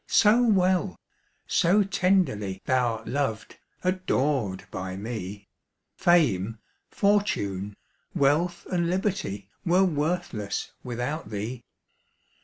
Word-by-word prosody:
so 220 +3 +5
well, 190 -4 +2 0.5
so 195 +4 +3
tenderly 180 - +1
Thou'rt 120 -4 +1
loved, 120 -3 -2 0.2
adored 145 - 0
by 95 0 -5
me, 100 -2 -6 0.5
Fame, 125 - +3 0.3
fortune, 105 - 0 0.4
wealth, 165 +5 +2
and 170 -2 +1
liberty, 180 - -2
Were 180 +1 +4
worthless 150 - -2
without 125 +4 -4
thee. 110 +4 -5
145 Hz, 85 wpm, -26 LUFS, -, 0.5 s, so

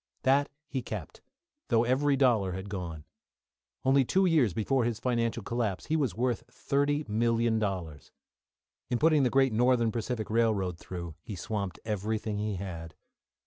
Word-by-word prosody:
That 140 +2 +3 0.2
he 135 -2 -3
kept, - - -7 0.5
though 115 -1 +3
every 135 +4 +2
dollar 115 -9 +3
had 95 +2 -6
gone. 85 -6 -5 0.8
Only 135 +1 +5
two 190 +9 +2
years 155 - +4
before 120 +7 +1
his 115 -2 -1
financial 115 -2 0
collapse 110 -4 -2
he 155 - 0
was 135 - 0
worth 120 0 0
$30,000,000. 115 - 0 0.8
In 120 - +1
putting 155 +1 +4
the 130 - +3
great 135 -1 +3
Northern 120 0 +3
Pacific 115 -1 -3
Railroad 105 -7 +1
through 85 -3 -6
he 105 - -7
swamped 100 -2 -4
everything 105 0 -2
he 105 -1 -1
had. 85 -4 -6
115 Hz, 145 wpm, -29 LUFS, 100-130 Hz, 0.8 s, Only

